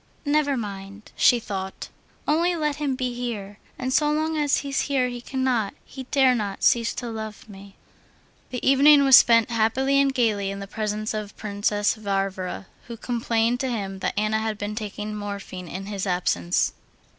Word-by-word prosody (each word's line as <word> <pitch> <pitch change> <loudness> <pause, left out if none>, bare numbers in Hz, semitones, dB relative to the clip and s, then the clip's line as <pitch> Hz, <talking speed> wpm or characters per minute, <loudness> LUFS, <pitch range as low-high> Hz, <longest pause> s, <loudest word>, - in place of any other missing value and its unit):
"Never 290 -1 +2
mind," 200 -1 -7
she 245 - +5
thought, 190 -3 -6 0.4
"only 340 +4 +2
let 300 -3 -1
him 285 -3 -1
be 255 -1 -2
here, 215 -5 -5 0.2
and 255 0 -2
so 300 +1 +3
long 315 +1 0
as 295 -2 +2
he's 275 -1 0
here 260 -3 +1
he 245 -1 -6
cannot, 250 -5 -1
he 265 -1 -9
dare 265 -2 +4
not, 205 -4 -3
cease 230 -1 +3
to 245 - -5
love 220 -1 -7
me." 200 -1 -13 0.7
The 250 - -4
evening 280 +2 +7
was 270 -2 +8
spent 230 0 +6
happily 260 +5 +2
and 275 -1 +2
gaily 215 -6 +1
in 195 - -5
the 200 - -6
presence 215 +1 -3
of 210 -1 -5
Princess 205 0 0
Varvara, 195 -3 -3 0.2
who 235 -1 -7
complained 235 0 0
to 265 - -1
him 195 -5 -4
that - - -3
Anna 215 +1 +1
had 220 -1 -2
been 205 0 -4
taking 210 -1 -5
morphine 200 -3 -6
in 190 +4 -6
his 200 -1 -4
absence. 90 - 0
220 Hz, 175 wpm, -24 LUFS, 200-260 Hz, 0.7 s, was